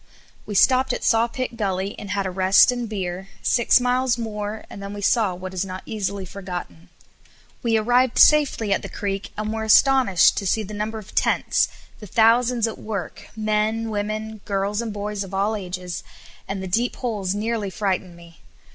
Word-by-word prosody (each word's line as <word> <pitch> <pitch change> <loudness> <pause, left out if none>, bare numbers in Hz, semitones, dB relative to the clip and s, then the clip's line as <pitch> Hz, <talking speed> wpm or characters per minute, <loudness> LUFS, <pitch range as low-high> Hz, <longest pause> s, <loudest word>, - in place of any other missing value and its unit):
We 205 - -5
stopped 255 +4 +4
at - - -4
Sawpit 235 +1 +1
Gully 195 -2 -1
and 205 - -8
had 200 0 -1
a 190 - -2
rest 190 +5 +5
and 245 -2 -4
beer, 190 -2 -4 0.2
six 235 +1 +4
miles 250 0 +1
more 215 -2 -5
and 200 - -10
then 200 +1 -6
we 205 - -6
saw 205 -3 +2
what 185 +1 -7
is 185 0 -1
not 185 -1 -7
easily 200 -3 -3
forgotten. 175 - -7 0.7
We 230 -2 +2
arrived 245 +3 +2
safely 280 -9 +5
at - - 0
the - - -7
creek, 200 -1 -4
and 215 +1 -2
were 220 - -3
astonished 220 - +5
to 195 - -1
see 220 +3 +1
the 210 +1 -8
number 215 +2 -3
of 210 -2 -11
tents, - - +2 0.3
the 210 - -10
thousands 230 +3 +3
at 225 - -6
work, 200 -6 -6
men, 215 +1 0
women, 215 +1 -4
girls, 200 +2 -1
and 230 -2 -4
boys 205 0 -4
of 195 0 -7
all 205 +3 +1
ages, 180 -3 -5 0.5
and 195 -1 -4
the - - -4
deep 235 +7 0
holes 205 -6 -2
nearly 215 -1 -2
frightened 185 -2 -2
me. 170 -1 -16
210 Hz, 180 wpm, -23 LUFS, 195-225 Hz, 0.7 s, rest